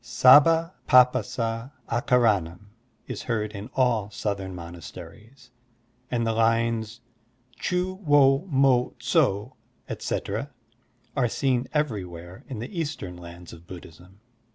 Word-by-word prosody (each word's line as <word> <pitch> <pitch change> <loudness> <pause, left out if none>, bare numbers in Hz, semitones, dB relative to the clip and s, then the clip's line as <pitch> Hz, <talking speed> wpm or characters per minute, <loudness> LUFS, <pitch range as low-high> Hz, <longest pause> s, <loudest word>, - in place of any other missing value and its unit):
Sabba 150 +8 +5 0.2
p^passa 125 -2 +3 0.2
akara 120 -4 +2
nam" 90 +5 -12 0.3
is - - -6
heard 110 -3 -2
in 105 +2 -8
all 115 -6 +1
Southern 95 -2 -4
monasteries, 90 - -11 0.6
and 120 -2 -1
the 115 - +1
lines 115 0 0 0.6
"Chu 180 +1 -1
wo 145 0 +4
mo 135 -4 +2
tso, 105 +7 0 0.3
etc.," - - -3 0.7
are 125 -3 +1
seen 130 0 0
every 145 -10 -1
where 90 +5 -11
in 130 - -5
the 170 - -6
Eastern 145 - -5
lands 85 0 -11
of 85 0 -14
Buddhism. 90 +2 -13
115 Hz, 115 wpm, -25 LUFS, 95-130 Hz, 0.7 s, Sabba